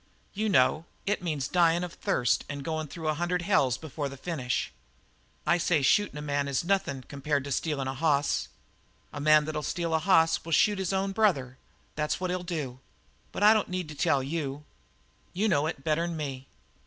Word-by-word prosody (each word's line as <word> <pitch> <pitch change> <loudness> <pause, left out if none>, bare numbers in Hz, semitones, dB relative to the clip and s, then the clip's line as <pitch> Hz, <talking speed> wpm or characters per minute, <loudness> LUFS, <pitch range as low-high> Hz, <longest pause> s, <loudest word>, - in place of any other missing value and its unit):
You 215 +2 -1
know; 155 +1 +3 0.2
it 205 -1 0
means 150 -6 -2
dyin' 170 -1 +3
of 175 -1 -5
thirst 120 -1 +1
and 140 -1 -5
goin' 155 0 -3
through 160 +2 -6
a 155 - +2
hundred 175 +2 -1
hells 135 - +2
before 150 -2 -5
the 135 - -9
finish. 130 -5 -2 0.7
I 170 +3 +3
say 165 -4 +2
shootin' 205 +3 +3
a 150 - -5
man 145 -1 -1
is 140 +1 0
nothin' 170 -8 0
compared 140 0 -2
with 140 - -2
stealin' 145 -4 -1
a 130 - -2
hoss. 145 0 +1 0.7
A 145 - -5
man 155 0 +5
that'll 155 0 -3
steal 165 +1 -2
a 160 - +3
hoss 165 -2 +3
will 165 - -4
shoot 205 +6 +4
his 190 -1 -1
own 195 0 0
brother; 155 - +1 0.3
that's 150 0 -1
what 185 -1 -2
he'll 180 0 -2
do. 150 -8 -4 0.5
But - - -3
I 210 +1 +8
don't 215 -2 0
need 180 -2 -3
to 150 - -8
tell 140 -1 +2
you. 145 -1 -4 0.7
You 205 +5 +1
know 150 -6 +2
it 145 -4 -5
better'n 165 +2 0
me. 135 -3 -5
155 Hz, 195 wpm, -28 LUFS, 140-175 Hz, 0.7 s, I